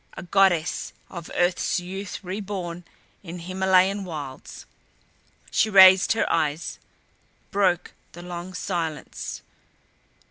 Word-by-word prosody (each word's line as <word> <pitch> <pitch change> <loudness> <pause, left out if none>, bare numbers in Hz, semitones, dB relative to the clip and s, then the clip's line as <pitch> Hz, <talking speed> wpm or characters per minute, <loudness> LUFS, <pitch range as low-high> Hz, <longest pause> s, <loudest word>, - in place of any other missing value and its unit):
A - - -6
goddess 180 -3 +2 0.2
of 170 -3 -8
earth's 180 +1 +1
youth 190 +3 -7
reborn 185 -3 -5 0.4
in 175 -2 -8
Himalayan 190 +2 +2
wilds. 150 -7 -8 0.9
She 220 - +2
raised 190 -1 +8
her 225 - 0
eyes; 155 0 -1 0.7
broke 190 -4 +1 0.2
the 175 - -10
long 180 +1 -7
silence. 165 -5 -4
180 Hz, 100 wpm, -24 LUFS, 170-190 Hz, 0.9 s, raised